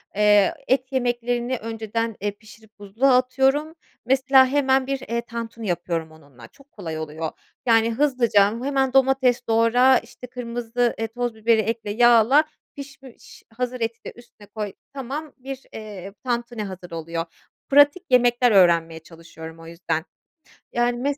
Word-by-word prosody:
Eee, 210 Hz, -2 st, +4 dB
et 260 Hz, 0 st, 0 dB
yemeklerini 245 Hz, -1 st, -1 dB
önceden, 225 Hz, 0 st, -4 dB
eee, 205 Hz, 0 st, -1 dB
pişirip 220 Hz, 0 st, -19 dB
buzluğa 230 Hz, +7 st, +2 dB
atıyorum, 270 Hz, +5 st, +1 dB, 0.3 s
mesela, 265 Hz, 0 st, +4 dB
hemen 265 Hz, -1 st, +1 dB
bir, 275 Hz, -1 st, -2 dB
eee, 235 Hz, -2 st, -3 dB
tantuni 230 Hz, -2 st, -7 dB
yapıyorum 170 Hz, -2 st, -3 dB
onunla, 140 Hz, -7 st, -16 dB
çok 275 Hz, -, -23 dB
kolay 160 Hz, -6 st, -6 dB
oluyor. 155 Hz, +1 st, -5 dB, 0.3 s
Yani, 230 Hz, -1 st, +3 dB
hızlıca 240 Hz, -7 st, +3 dB, 0.2 s
hemen 270 Hz, -1 st, 0 dB
domates 265 Hz, -2 st, +3 dB
doğra, 230 Hz, +3 st, +4 dB
işte, 250 Hz, -, -9 dB
kırmızı, 240 Hz, -1 st, -2 dB
eee, 225 Hz, -, -1 dB
toz 240 Hz, 0 st, -4 dB
biberi 220 Hz, 0 st, +2 dB
ekle, 225 Hz, -1 st, -3 dB
yağla, 240 Hz, +5 st, +5 dB, 0.3 s
pişmiş 275 Hz, -3 st, -13 dB
hazır 250 Hz, -1 st, -3 dB
eti 230 Hz, 0 st, -3 dB
de -, -, -8 dB
üstüne 225 Hz, -3 st, -17 dB
koy, 210 Hz, -2 st, -6 dB, 0.2 s
tamam, 280 Hz, +3 st, -6 dB
bir, 270 Hz, +1 st, -8 dB
eee, 200 Hz, -3 st, -9 dB
tantuni 240 Hz, -2 st, -3 dB
hazır 185 Hz, -3 st, -9 dB
oluyor. 165 Hz, 0 st, -4 dB, 0.4 s
Pratik 290 Hz, +5 st, +5 dB
yemekler 245 Hz, -1 st, +4 dB
öğrenmeye 170 Hz, -4 st, +3 dB
çalışıyorum 160 Hz, -1 st, -12 dB
o 165 Hz, -, -12 dB
yüzden, 165 Hz, -1 st, -3 dB, 0.7 s
yani, 240 Hz, 0 st, +1 dB
mes 280 Hz, +3 st, -2 dB
235 Hz, 140 wpm, -23 LUFS, 205-260 Hz, 0.7 s, yağla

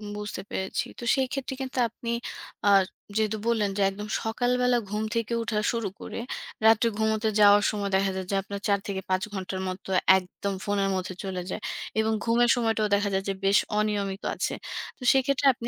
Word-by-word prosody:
বুঝতে 210 Hz, 0 st, -5 dB
পেরেছি। 190 Hz, 0 st, -2 dB
তো -, -, -7 dB
সেইক্ষেত্রে 265 Hz, 0 st, -2 dB
কিন্তু 265 Hz, 0 st, -5 dB
আপনি, 235 Hz, +1 st, -7 dB, 0.6 s
আ -, -, +7 dB, 0.5 s
যেহেতু 220 Hz, 0 st, +1 dB
বললেন 220 Hz, -3 st, +2 dB
যে, 200 Hz, -, +1 dB
একদম 205 Hz, +2 st, -7 dB, 0.2 s
সকালবেলা 245 Hz, +2 st, +2 dB
ঘুম 210 Hz, +1 st, -1 dB
থেকে 230 Hz, 0 st, -1 dB
ওঠা 220 Hz, -1 st, -2 dB
শুরু 230 Hz, -3 st, -1 dB
করে -, -, -6 dB, 0.5 s
রাত্রে 225 Hz, +1 st, +6 dB
ঘুমোতে 220 Hz, 0 st, +1 dB
যাওয়ার 205 Hz, 0 st, +7 dB
সময় 205 Hz, -2 st, -2 dB
দেখা 195 Hz, 0 st, +2 dB
যায় 190 Hz, 0 st, -3 dB
যে -, -, +1 dB
আপনার 200 Hz, +1 st, -7 dB
৪ 200 Hz, -1 st, +3 dB
থেকে 195 Hz, -1 st, -3 dB
৫ 185 Hz, +1 st, +1 dB
ঘণ্টার 190 Hz, -1 st, -4 dB
মতো 185 Hz, +1 st, -6 dB, 0.3 s
একদম 190 Hz, +2 st, -4 dB
ফোনের 200 Hz, -1 st, +1 dB
মধ্যে 185 Hz, 0 st, -3 dB
চলে 190 Hz, -2 st, -3 dB
যায়, 215 Hz, -, -4 dB, 0.4 s
এবং 220 Hz, 0 st, +2 dB
ঘুমের 235 Hz, +1 st, +3 dB
সময়টাও 225 Hz, -3 st, +1 dB
দেখা 200 Hz, 0 st, +1 dB
যায় 190 Hz, 0 st, +1 dB
যে -, -, +1 dB
বেশ 195 Hz, +1 st, +5 dB, 0.2 s
অনিয়মিত 205 Hz, -2 st, -1 dB
আছে। -, -, -1 dB, 0.4 s
তো -, -, -11 dB
সেইক্ষেত্রে 270 Hz, +1 st, +2 dB
আপনি, 235 Hz, -1 st, -6 dB
210 Hz, 180 wpm, -27 LUFS, 195-230 Hz, 0.6 s, আ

